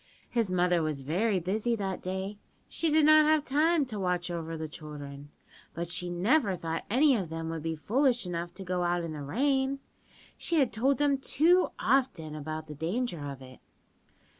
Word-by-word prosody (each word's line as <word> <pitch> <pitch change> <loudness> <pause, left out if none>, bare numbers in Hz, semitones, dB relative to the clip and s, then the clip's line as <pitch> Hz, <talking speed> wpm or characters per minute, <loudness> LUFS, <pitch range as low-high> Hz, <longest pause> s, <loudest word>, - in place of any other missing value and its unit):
"His 230 -6 0
mother 180 -1 +2
was 155 -3 -2
very 185 +8 +1
busy 210 +7 0
that 195 -3 -3
day. 190 +2 -4 0.3
She 330 - -1
did 310 0 +4
not 310 0 +7
have 310 -1 +3
time 305 +2 +2
to 220 -5 -6
watch 180 -2 -1
over 165 -1 -4
the 160 0 -4
children, 145 -2 -9 0.5
but 170 0 -4
she 175 0 0
never 195 - +2
thought 165 -2 -4
any 270 +5 +4
of 190 -7 -2
them 165 0 -4
would 165 -1 -4
be 165 +1 -2
foolish 245 - +1
enough 170 -1 -4
to 190 - -7
go 180 -1 -2
out 175 0 0
in 165 -2 -4
the 150 - -6
rain. 265 - 0 0.6
She 340 - -1
had 275 -7 +3
told 265 +5 +2
them 280 -1 +2
too 340 +7 +3
often 240 - +1
about 155 +1 -5
the 150 - -8
danger 170 - -2
of 135 -1 -8
it. 130 0 -13
185 Hz, 190 wpm, -29 LUFS, 165-265 Hz, 0.6 s, not